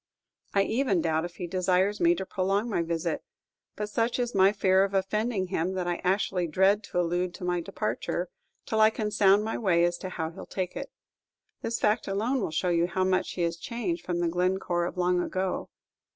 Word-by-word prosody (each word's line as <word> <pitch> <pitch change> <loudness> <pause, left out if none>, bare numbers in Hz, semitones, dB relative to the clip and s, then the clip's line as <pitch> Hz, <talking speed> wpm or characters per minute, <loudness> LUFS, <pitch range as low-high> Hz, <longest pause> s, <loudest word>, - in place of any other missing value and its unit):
I 195 - +5
even 220 -5 +1
doubt 160 0 +1
if 175 0 -8
he 180 - -5
desires 185 +3 +1
me 170 0 +4
to 190 - -4
prolong 195 +3 0
my 210 -7 0
visit; 165 -1 -2 0.5
but 210 - -3
such 230 +3 0
is 245 -1 -1
my 195 0 +5
fear 190 -2 +3
of 195 0 -2
offending 195 0 0
him, 180 0 -1
that 185 -1 -2
I 175 -1 -2
actually 185 -1 +1
dread 190 +6 +3
to 180 - -2
allude 175 +1 0
to - - -9
my 175 -1 0
departure, - - -3 0.4
till 220 -3 +1
I 215 - +8
can 215 -1 -3
sound 205 0 +4
my 220 - -2
way 180 -6 +3
as 175 0 +1
to 185 - -5
how 160 -3 -3
he - - -13
'll - - -8
take 185 -2 -3
it. - - -5 0.7
This 230 - -2
fact 210 +1 +1
alone 225 +7 0
will - - -1
show 160 +3 0
you 170 0 +2
how 185 +1 0
much 185 0 +1
he 175 - -2
is 170 0 -1
changed 185 -4 -3
from 175 -1 -2
the 170 - +1
Glencore 180 0 0
of 180 - -5
long 180 0 +2
ago. 185 +1 -2
185 Hz, 215 wpm, -28 LUFS, 175-205 Hz, 0.7 s, I